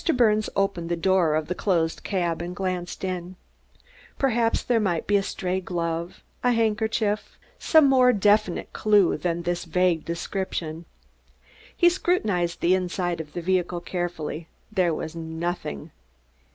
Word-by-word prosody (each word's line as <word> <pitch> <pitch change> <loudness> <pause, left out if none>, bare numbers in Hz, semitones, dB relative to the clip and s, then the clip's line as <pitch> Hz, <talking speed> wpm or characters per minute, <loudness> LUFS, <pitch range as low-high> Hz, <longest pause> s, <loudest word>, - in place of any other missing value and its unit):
Mr. 325 - +1
Birnes 215 -3 +3
opened 195 -4 0
the 170 - +1
door 170 -2 +2
of 155 -1 -1
the 180 - -1
closed 170 -4 0
cab 175 -4 -1
and 175 +1 -5
glanced 180 -1 -3
in. 185 -1 -4 0.8
Perhaps 235 -4 +1
there 240 -2 +2
might 180 -6 0
be 205 - +2
a 200 - +4
stray 185 -1 -2
glove, 170 -1 -3 0.2
a 245 0 +4
handkerchief, 220 -1 0 0.2
some 315 -3 +5
more 255 -2 +5
definite 205 -3 +2
clew 205 -4 +3
than 170 -1 -2
this 175 0 -1
vague 175 -1 +1
description. 170 -1 -4 0.9
He 345 - +5
scrutinized 215 - +1
the 175 - +4
inside 180 -2 -1
of 150 -2 -12
the 175 - -4
vehicle 180 -1 0
carefully; 170 -3 -4 0.2
there 185 -5 +2
was 160 +1 -4
nothing. 160 - -4
180 Hz, 145 wpm, -25 LUFS, 170-210 Hz, 0.9 s, some